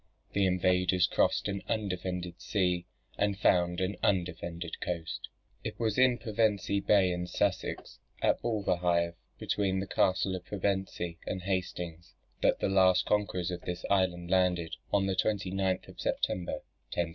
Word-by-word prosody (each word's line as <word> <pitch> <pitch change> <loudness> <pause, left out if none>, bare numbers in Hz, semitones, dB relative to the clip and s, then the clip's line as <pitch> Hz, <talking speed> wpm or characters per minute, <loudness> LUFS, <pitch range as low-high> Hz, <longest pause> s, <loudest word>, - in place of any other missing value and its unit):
The 100 -1 +3
invaders 90 0 +3
crossed - - +2
an 100 -1 -2
undefended 90 -4 -3
sea, 90 -3 0 0.3
and 100 -1 +1
found 90 -3 +3
an 95 +2 -1
undefended 85 -2 -1
coast. 85 -2 -4 0.3
It - - -5
was 110 -1 +1
in 130 -1 +5
Pevensey 105 -4 +1
Bay 100 -2 +4
in 90 0 -2
Sussex, - - -2 0.2
at - - +2
Bulverhithe, 90 -6 +1 0.2
between 95 -2 0
the 95 - -2
castle 95 0 +1
of 90 - -6
Pevensey 95 -3 -2
and 95 - -3
Hastings, 90 -3 -3 0.3
that - - +3
the - - +1
last 95 -2 +4
conquerors 95 -4 0
of 90 -1 -4
this 90 0 -5
island 90 -3 +1
landed, 90 -3 +2 0.2
on 100 -1 +3
the 95 -1 0
29th 95 -2 0
of - - -13
September, 90 -1 -1 0.3
1066. 85 -1 0
95 Hz, 145 wpm, -30 LUFS, 90-100 Hz, 0.3 s, in